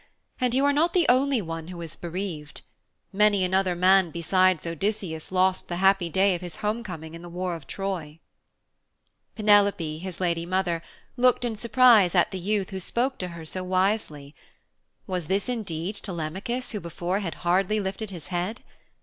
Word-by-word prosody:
And 250 -1 +1
you 270 +2 +3
are 285 - +4
not 330 +4 +2
the 355 -3 +3
only 260 -2 +3
one 165 -1 -6
who 180 -1 -8
is 165 -1 -7
bereaved 170 -4 -5 0.5
many 205 -1 +4
another 185 0 +1
man 185 0 +4
besides 185 +1 +2
Odysseus 170 -1 -3
lost 185 0 +2
the 175 - -3
happy 190 -1 +3
day 190 +3 +3
of 175 - -4
his 175 -3 -6
homecoming 185 -8 -4
in 165 - -9
the 175 - -9
war 180 +1 -3
of 160 -5 -11
Troy.' 175 -6 -4 1.2
Penelope, 200 -7 +3
his 185 0 -7
lady 170 -2 0
mother, 175 -1 -1 0.4
looked 250 0 +3
in 230 -2 -2
surprise 230 -4 +5
at 175 - +3
the 190 - -4
youth 200 +1 -1
who 190 - -4
spoke 245 +8 -1
to 180 - -2
her 170 -2 -9
so 185 +3 -4
wisely. 185 -6 -1 0.7
Was 180 -5 -3
this 195 +4 0
indeed 200 -5 -3
Telemachus 190 +8 -4
who 210 - -3
before 175 +2 -3
had 180 -5 -4
hardly 190 +4 +2
lifted 195 +2 -4
his 175 -4 -9
head? 185 +6 -3
185 Hz, 170 wpm, -26 LUFS, 170-210 Hz, 1.2 s, surprise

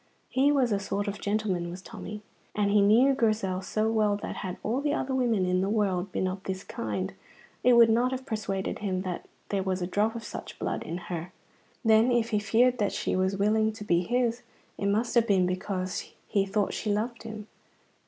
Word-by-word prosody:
He 275 +3 +3
was 265 -5 +2
a 200 - +2
sort 200 +1 -2
of 200 0 -4
gentleman, 200 -4 -1
was 175 +2 -7
Tommy. 210 +2 -8 0.3
And 205 -1 +2
he 205 0 +5
knew 230 +7 +5
Grizel 215 -7 0
so 215 +3 -1
well 215 -2 +2
that - - -4
had 185 -2 -4
all 245 +5 0
the 295 +1 +1
other 265 -3 -2
women 235 -7 +2
in 180 0 +1
the 195 - 0
world 200 -3 0
been 185 - 0
of 185 +1 -4
this 190 0 -3
kind, 100 -4 -3 0.5
it 250 - +6
would 235 -1 +8
not 240 +3 +3
have 260 0 -4
persuaded 205 -5 -3
him 190 -3 -2
that 180 -2 -5 0.2
there 200 -1 0
was 190 -1 -1
a 175 - -1
drop 210 +5 0
of 230 - -5
such - - -7
blood - - -2
in 170 - -4
her. 175 0 -5 0.5
Then, 225 +2 +5
if 235 -1 +2
he 210 - +2
feared 240 +4 +3
that 205 -2 +1
she - - -1
was 190 +1 +1
willing 215 +2 +2
to 215 - -8
be 175 -4 +2
his, 240 +3 0 0.3
it 200 - -2
must 220 +4 +1
have 235 -1 +4
been 190 -4 +4
because 185 0 -3 0.2
he 195 -1 +1
thought 200 0 0
she 215 - -2
loved 230 +3 -2
him? 215 -2 -7
210 Hz, 210 wpm, -28 LUFS, 190-230 Hz, 0.5 s, would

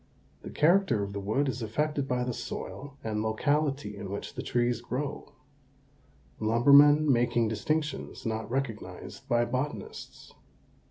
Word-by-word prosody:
The - - -8
character 155 - +3
of 100 0 -5
the 100 - -3
wood 110 +9 0
is 125 -2 -3
affected 140 +5 -1
by 125 -1 0
the 125 0 -2
soil 140 +4 -7
and 110 -1 -2
locality 135 +1 0
in 100 -1 -7
which 100 +1 -5
the - - -5
trees 120 -1 0
grow, 135 +3 -4 1.1
lumbermen 140 +7 +6
making 120 -1 +2
distinctions 150 +9 -2
not 110 -1 -3
recognized 125 -4 -5
by 120 0 +3
botanists. 130 +5 -5
125 Hz, 130 wpm, -29 LUFS, 110-145 Hz, 1.1 s, lumbermen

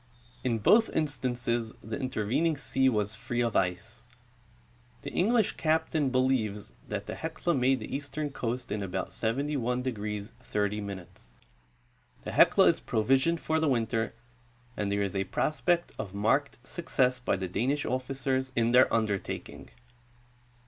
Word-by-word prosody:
In 120 -3 +1
both 220 - +5
instances 120 -6 -1
the 110 +4 -4
intervening 130 +5 0
sea 135 -1 +2
Avas 105 -3 -1
free 120 +1 -2
of 115 -2 0
ice. 100 +6 -1 1.0
The - - -5
English 220 +3 +2
captain 155 -2 +1
believes 130 -6 0
that - - -4
the - - -5
Helia 170 - -2
made 130 0 +3
the 110 - -5
eastern 145 +1 -4
coast 125 -2 -3
in 105 0 -1
about 95 -1 -3
71° 120 -4 -2
30'. 105 -2 -1 1.4
The - - -5
Helia - - +6
is - - +3
provisioned 135 +9 +2
for 160 0 0
the 160 -2 +2
winte'r, 115 -2 0 0.6
and 100 -1 -1
there 100 0 +1
is 100 -1 -3
a 95 0 0
prospect 170 - 0
of 100 -2 -5
marked 125 +8 +1
success 130 -7 0
by 125 - 0
the 95 -1 -3
Danish 130 +11 0
officers 130 0 -1
in 115 0 +2
their 125 +1 +6
undertaking. 105 -4 -2
125 Hz, 135 wpm, -29 LUFS, 110-140 Hz, 1.4 s, Helia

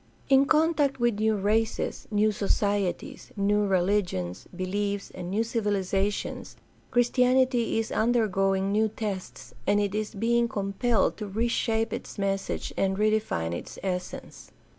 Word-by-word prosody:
In 270 0 +6
contact 305 -3 +2
with 240 -3 +1
new 220 0 +2
races, 215 +3 -1
new 215 0 +2
societies, 200 -2 -1
new 205 +1 +2
religious 180 - 0
beliefs, 200 +2 -3
and 180 -1 -6
new 210 +4 +1
civihzations 205 -3 -1 0.3
Christianity 250 0 +2
is 225 0 -1
undergoing 195 -4 +1
new 215 +2 +3
tests, 190 - -6
and 205 - +4
it 205 -1 0
is 215 +1 -3
being 235 +3 +2
compelled 200 +1 0
to 210 - -5
reshape 225 +1 0
its - - -6
message 195 -1 -2
and 190 0 0
redefine 210 - 0
its 85 - -7
essence. 180 -2 -5
205 Hz, 125 wpm, -27 LUFS, 195-225 Hz, 0.3 s, In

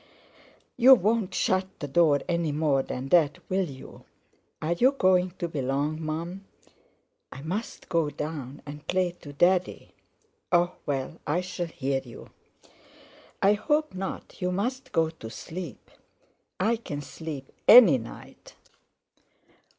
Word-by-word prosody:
"You 260 +2 +9
won't 215 -2 0
shut 185 0 +1
the 145 - -5
door 145 -1 +3
any 170 -3 0
more 145 -2 +2
than 130 0 -5
that, 155 -4 +4
will 190 -2 +1
you? 130 -1 -12 0.5
Are 160 +2 0
you 255 +10 +3
going 185 -7 +3
to 175 - -2
be 155 -4 -4
long, 140 +4 -1
Mum?" 170 +5 -4 0.9
"I 135 - -9
must 195 +8 -5
go 165 -3 +1
down 145 -2 -6
and 150 +1 -10
play 180 -1 +1
to 145 - -9
Daddy." 180 +5 +1 0.6
"Oh! 175 0 +3
well, 140 +3 -3
I 170 +5 +1
shall 180 -1 -4
hear 135 -4 -2
you." 120 -3 -12 1.1
"I 200 +1 +6
hope 300 +8 0
not; 190 +1 -6
you 180 0 0
must 245 +8 -3
go 160 -2 +1
to 115 -9 -10
sleep." 160 - -8 0.7
"I 225 +5 +2
can 145 -10 -6
sleep 145 -3 -8 0.2
any 215 - +9
night." 115 - -12
170 Hz, 135 wpm, -27 LUFS, 145-185 Hz, 1.1 s, You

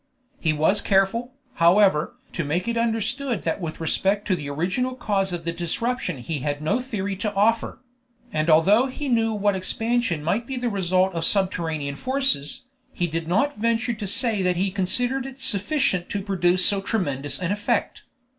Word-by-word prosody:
He 160 - +1
was 160 +7 +2
careful, 205 +6 +1 0.3
however, 170 -2 +4 0.2
to 165 - -2
make 165 +8 -2
it 235 - -1
understood 230 +1 -1
that 165 +4 -2
with 160 -2 -5
respect 195 +5 +1
to 185 - +2
the 145 -4 -6
original 190 - -1
cause 195 -6 -1
of 170 -1 -5
the 170 - 0
disruption 180 - -2
he 145 +5 -4
had 145 +2 -2
no 160 +10 0
theory 200 -6 -3
to 210 +1 -2
offer; 225 +5 +1 0.5
and 155 +1 0
although 195 +11 +5
he 280 +2 -5
knew 225 -3 +2
what 205 -2 +1
expansion 225 -2 -1
might 205 +9 -1
be 265 - -4
the 245 -1 -1
result 185 -2 +1
of 165 -1 -2
subterranean 165 -6 0
forces, 260 - 0 0.3
he 175 - -1
did 165 -1 -3
not 275 +12 +1
venture 230 +1 +1
to 215 -2 -5
say 220 +1 +2
that 180 -1 +1
he 190 +1 0
considered 245 +8 +1
it 265 -1 -10
sufficient 205 - 0
to 200 -1 -3
produce 185 -2 +2
so 200 -1 +4
tremendous 145 -10 -2
an 180 0 -2
effect. 205 0 -1
195 Hz, 175 wpm, -24 LUFS, 170-230 Hz, 0.5 s, although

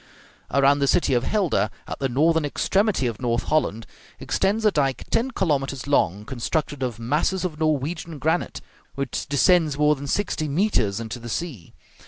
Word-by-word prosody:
Around 140 +1 +4
the 140 - +2
city 140 -1 +2
of 120 -1 +2
Helder, 165 - +1 0.2
at - - -6
the 135 - 0
northern 160 +5 +2
extremity 195 - +1
of 115 -2 -3
North 120 -1 0
Holland, 115 -8 0 0.3
extends 210 +3 0
a 210 - +5
dike 135 -6 0
ten 240 +3 +1
kilometres 140 - -1
long, 105 -8 +1
constructed 140 +3 -2
of 125 -4 -2
masses 150 +10 0
of 160 -4 -4
Norwegian 155 +1 -1
granite, 160 +5 -1 0.3
which 140 -2 -3
descends 150 +1 +3
more 150 0 +4
than 140 0 -7
sixty 155 -2 -1
metres 140 - +1
into 115 +1 -6
the 120 0 -8
sea. 120 - -5
145 Hz, 165 wpm, -24 LUFS, 125-165 Hz, 0.3 s, a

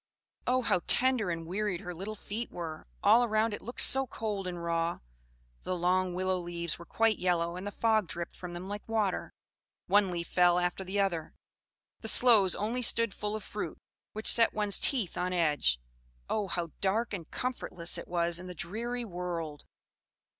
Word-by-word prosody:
Oh, 255 0 +2
how 180 - +2
tender 250 -6 +3
and 165 -1 -3
wearied 190 +1 -2
her 180 -3 -6
little 195 +5 -6
feet 220 +3 -5
were! 160 - -7 0.2
All 240 - +6
around 220 -1 +1
it - - -5
looked 240 - -1
so 270 0 +5
cold 210 -5 -4
and 175 -1 -5
raw: 170 0 0 0.6
the 185 - -3
long 180 +1 +1
willow 185 0 0
leaves 170 -2 -4
were 170 - -11
quite 225 -2 +2
yellow, 170 -1 0
and 185 +3 -6
the - - -3
fog 220 -3 +2
dripped 170 +1 -6
from 180 -1 -8
them 175 +1 -6
like 205 +1 -5
water; 215 -4 0 0.5
one 200 -1 +4
leaf 170 -1 -4
fell 175 -1 +4
after 180 +2 -1
the 190 +2 -2
other: 175 -5 -1 0.6
the 220 - -6
sloes 220 -6 +6
only 225 +5 -2
stood 230 -3 +3
full 210 0 -3
of 215 - -6
fruit, - - -5 0.4
which 215 +1 -6
set 230 -1 +3
one's 210 -2 +4
teeth 235 - +2
on 180 +1 -1
edge. 150 - +2 0.5
Oh, 210 -2 -1
how 170 -2 -3
dark 215 +4 +1
and 170 -5 -6
comfortless 180 -9 -2
it - - -9
was 170 -1 0
in 185 - -9
the 180 - -8
dreary 235 +9 -4
world! 170 -6 -5
185 Hz, 180 wpm, -30 LUFS, 175-215 Hz, 0.6 s, All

